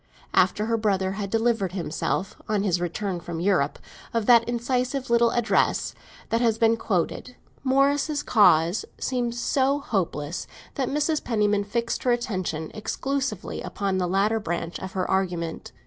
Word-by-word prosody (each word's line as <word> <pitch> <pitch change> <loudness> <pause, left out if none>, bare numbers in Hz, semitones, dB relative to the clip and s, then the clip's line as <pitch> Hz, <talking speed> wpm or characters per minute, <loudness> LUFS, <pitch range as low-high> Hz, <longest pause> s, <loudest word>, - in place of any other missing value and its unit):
After 210 - +3
her 230 0 +1
brother 195 -3 +1
had 200 0 -4
delivered 225 -4 +1
himself, 190 +2 -2
on 210 -2 +1
his 180 -4 +1
return 180 +1 -2
from 170 -1 -6
Europe, 175 -6 +1 0.4
of 230 -2 +1
that 235 -1 +7
incisive 250 +2 -1
little 235 0 +5
address 240 -1 +1 0.4
that 230 +1 +1
has 225 -2 +2
been 225 0 +4
quoted, 225 +4 -2 0.3
Morris's 280 +2 +2
cause 175 -4 +4
seemed 245 -2 -1
so 265 +3 +1
hopeless 180 - -2 0.3
that 265 -3 -1
Mrs. 300 +2 0
Penniman 210 -3 +1
fixed 235 +3 -2
her 250 - +2
attention 185 -10 -2
exclusively 260 0 -3
upon 195 -2 -2
the 180 - 0
latter 200 +5 +2
branch 170 -2 -3
of 190 0 -7
her 185 -1 -1
argument. 175 -4 -2
215 Hz, 145 wpm, -25 LUFS, 185-240 Hz, 0.4 s, that